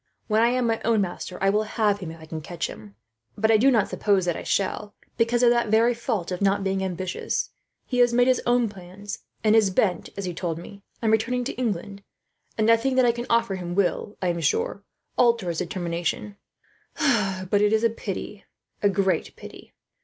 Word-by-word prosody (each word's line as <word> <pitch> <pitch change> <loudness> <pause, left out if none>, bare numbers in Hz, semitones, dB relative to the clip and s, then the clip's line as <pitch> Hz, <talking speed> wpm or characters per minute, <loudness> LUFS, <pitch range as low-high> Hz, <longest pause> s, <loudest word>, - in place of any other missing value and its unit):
When 215 0 +2
I 230 - +5
am 250 0 +1
my 225 -1 0
own 225 -1 +2
master 180 -1 -4
I 195 0 +4
will 210 +1 +2
have 215 -1 0
him, 180 -5 -6
if 165 0 -10
I 160 - -11
can 160 0 -6
catch 170 +2 -4
him; 105 -2 -9 0.4
but 220 +2 +3
I 220 - +6
do 255 +6 +5
not 225 -6 +3
suppose 200 -3 +1
that 175 -2 0
I - - -5
shall, 205 +1 -2 0.2
because 235 +1 +2
of 240 - +6
that 240 -1 +2
very 225 +3 +4
fault 225 -7 -3
of 180 - -3
not 200 0 +2
being 195 0 -1
ambitious. 185 -1 -3 0.3
He 250 - -2
has 245 -1 +5
made 245 +1 +4
his 255 -1 +3
own 240 -1 +3
plans, 200 +1 -9 0.2
and 215 0 +4
is 215 -3 +5
bent, 185 -2 0
as 200 - -3
he 180 - -3
told 165 -2 -3
me, 200 +4 -11 0.2
on 220 - +3
returning 240 +3 +1
to 250 - -3
England; 200 -4 -3 0.6
and 215 - +2
nothing 230 +4 +3
that 255 -1 +5
I 240 - +5
can 240 +1 -6
offer 230 -3 +2
him 175 -1 -5
will, 200 +2 0
I 180 - +2
am 170 -1 -1
sure, 165 +5 0 0.4
alter 235 -7 +3
his 165 - -2
determination. 175 +2 -3 1.2
But 205 - +4
it 210 0 +3
is 220 +1 +2
a 230 - +5
pity, 210 -1 -6 0.4
a 205 - +4
great 195 -1 0
pity.' - - -12
205 Hz, 215 wpm, -25 LUFS, 185-230 Hz, 1.2 s, I